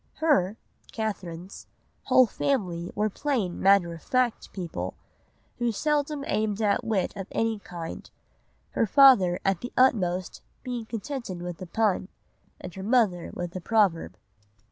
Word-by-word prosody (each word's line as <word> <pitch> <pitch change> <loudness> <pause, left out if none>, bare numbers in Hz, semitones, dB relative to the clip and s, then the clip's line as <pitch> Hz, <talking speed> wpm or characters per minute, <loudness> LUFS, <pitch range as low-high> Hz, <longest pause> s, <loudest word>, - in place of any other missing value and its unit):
"Her 245 - +2 0.3
[Catherine's] 190 -5 -5 0.4
whole 255 -1 +6
family 185 -10 -1
were 210 - +1
plain 215 -5 -2
matter 190 -3 +4
of 165 - -10
fact 255 -3 0
people, 175 -4 -5 0.6
who 240 -1 +1
seldom 295 +4 -1
aimed 215 -4 -1
at 210 -2 +1
wit 205 -4 -1
of 195 -2 -6
any 225 -1 0
kind; 170 -4 -8 0.6
her 230 - +1
father 200 -9 +6
at 195 -2 +1
the 245 - -6
utmost 185 -8 +2 0.2
being 245 -3 -4
contented 225 -6 -5
with 175 -1 -6
a 185 - -6
pun, 205 0 0 0.5
and - - -8
her 190 - -7
mother 205 -5 +2
with 175 0 -5
a 185 - -4
proverb." 170 - +1
205 Hz, 140 wpm, -27 LUFS, 180-240 Hz, 0.6 s, whole